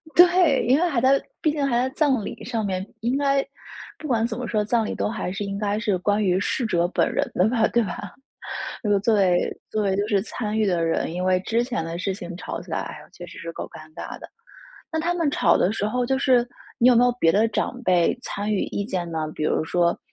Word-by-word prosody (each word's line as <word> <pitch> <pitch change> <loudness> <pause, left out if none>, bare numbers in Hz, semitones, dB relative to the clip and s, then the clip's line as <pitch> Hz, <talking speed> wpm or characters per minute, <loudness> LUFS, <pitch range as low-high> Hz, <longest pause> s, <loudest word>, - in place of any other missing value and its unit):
对， 350 -7 +5
因 260 +4 +4
为 355 - +2
还 260 -6 +1
在 270 +2 +4 0.2
毕 310 - +2
竟 290 -2 -1
还 240 -3 +1
在 255 +2 +1
葬 270 -8 +2
礼 - - -7
上 225 -3 -2
面， 190 -1 -2 0.2
应 245 +4 0
该， 275 -1 +2 0.5
不 305 - -7
管 230 -3 +1
怎 230 0 -3
么 250 - -4
说， 215 -2 0
葬 225 0 +1
礼 - - -3
都 - - -1
还 215 -5 -3
是 200 +2 -4
应 200 0 -4
该 205 0 -1
是 210 -5 0
关 205 +3 +1
于 185 -1 +2
逝 235 +4 -1
者 175 -5 +1
本 - - +1
人 - - 0
的 185 - +4
吧， 230 -3 +2
对 235 -1 +2
吧？ 195 0 -6 0.7
如 210 - -1
果 200 - +4
作 220 +2 +2
为 185 -3 +2
作 215 -1 -1
为 190 -1 +1
就 205 +1 0
是 200 -3 +2
参 220 -1 -3
与 215 - +3
的 175 -3 +1
人 165 0 -1
因 180 - -3
为 185 0 +3
之 230 +5 0
前 240 -9 -2
的 165 +1 -4
事 195 0 -1
情 180 -2 -7
吵 - - -5
起 - - -12
来， - - -3 0.2
确 - - -9
实 - - -12
是 165 - -6
够 - - -5
尴 155 0 -12
尬 - - -7
的。 - - -11 0.6
那 320 - -1
她 345 +2 0
们 335 -4 +1
吵 - - +3
的 185 - +2
时 205 - -1
候 250 +2 0
就 265 +2 +1
是 250 -3 +3 0.3
你 240 - +6
有 245 - +5
没 240 - +5
有 245 - +4
别 165 - +4
的 215 +4 +3
长 250 +3 -2
辈 180 0 +3
参 210 -2 -3
与 200 - +1
意 200 - -3
见 180 -6 -3
呢？ 160 -1 -2
比 155 - -3
如 155 - +1
说 170 0 +1
215 Hz, 275 characters per minute, -24 LUFS, 185-250 Hz, 0.7 s, 你